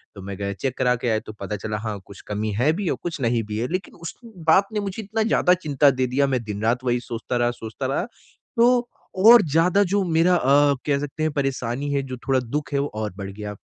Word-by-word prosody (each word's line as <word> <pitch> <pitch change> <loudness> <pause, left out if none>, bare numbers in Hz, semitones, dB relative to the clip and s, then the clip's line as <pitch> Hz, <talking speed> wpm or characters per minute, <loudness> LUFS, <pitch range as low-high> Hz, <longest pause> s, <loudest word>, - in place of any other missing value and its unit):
तो 100 - -9
मैं 100 0 -7
गया 100 0 -3
चेक 130 +5 -3
करा 125 -1 +2
के 120 +1 -4
आया 110 -1 +2
तो 110 - -10
पता 100 +1 -4
चला 105 +1 -4
हाँ, 105 -2 -4
कुछ 100 - -13
कमी 105 +1 -2
है 125 +9 +2
भी 190 0 -2
और - - -1
कुछ 170 -3 -4
नहीं 115 -1 +1
भी 105 0 -5
है। 120 +3 -1
लेकिन 185 +1 -4
उस 165 -1 -7
बात 190 -2 +2
ने 210 - 0
मुझे 200 +1 -4
इतना 220 +2 -1
ज़्यादा 200 -5 +3
चिंता 145 -5 +3
दे 130 0 0
दिया 140 +3 +1
मैं 130 -3 -1
दिन-रात 110 +4 -1
वही 125 -1 +1
सोचता 120 +1 -4
रहा 120 0 +2
सोचता 115 +2 -7
रहा। 135 +7 -1 0.5
तो 240 +1 +4 0.4
और 240 - +9
ज़्यादा 180 +6 +4
जो 200 +1 +1
मेरा 170 +1 +3
अ, 145 -1 +4
कह 140 -2 +1
सकते 145 +2 -4
हैं 155 - +1
परेशानी 135 -1 -2
है, 140 - +1
जो 130 -1 -6
थोड़ा 135 -1 +3
दुःख 130 +3 -4
है 140 - +2
वो 140 - 0
और 105 -2 -3
बढ़ 100 -1 -6
गया 105 0 -7
135 Hz, 245 wpm, -23 LUFS, 115-165 Hz, 0.5 s, और